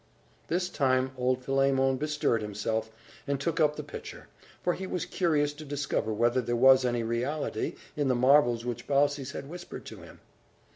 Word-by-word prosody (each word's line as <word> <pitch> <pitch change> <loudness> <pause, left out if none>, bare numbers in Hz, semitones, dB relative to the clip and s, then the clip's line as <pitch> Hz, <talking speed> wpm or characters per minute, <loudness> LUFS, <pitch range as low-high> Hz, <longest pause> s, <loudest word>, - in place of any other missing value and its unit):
This 180 +2 0
time, 130 -6 +1
old 130 0 0
Philemon 135 -1 +2
bestirred 145 -5 0
himself, 110 +2 -2 0.4
and 140 -1 0
took 165 +3 -1
up 150 -1 +3
the - - -5
pitcher; - - -9 0.3
for 175 - +2
he 190 +1 -5
was 180 -1 -2
curious 155 -5 +1
to 150 +1 -10
discover 145 -6 -2
whether 120 +4 +2
there 120 0 -1
was 130 +2 +6
any 120 -2 0
reality 120 +2 -2 0.2
in 145 -2 0
the 130 - +2
marvels 120 -2 +4
which 120 -1 -4
Baucis 140 0 +1
had 140 - -6
whispered 175 +3 -9
to - - -9
him. - - -13
135 Hz, 175 wpm, -29 LUFS, 120-150 Hz, 0.4 s, was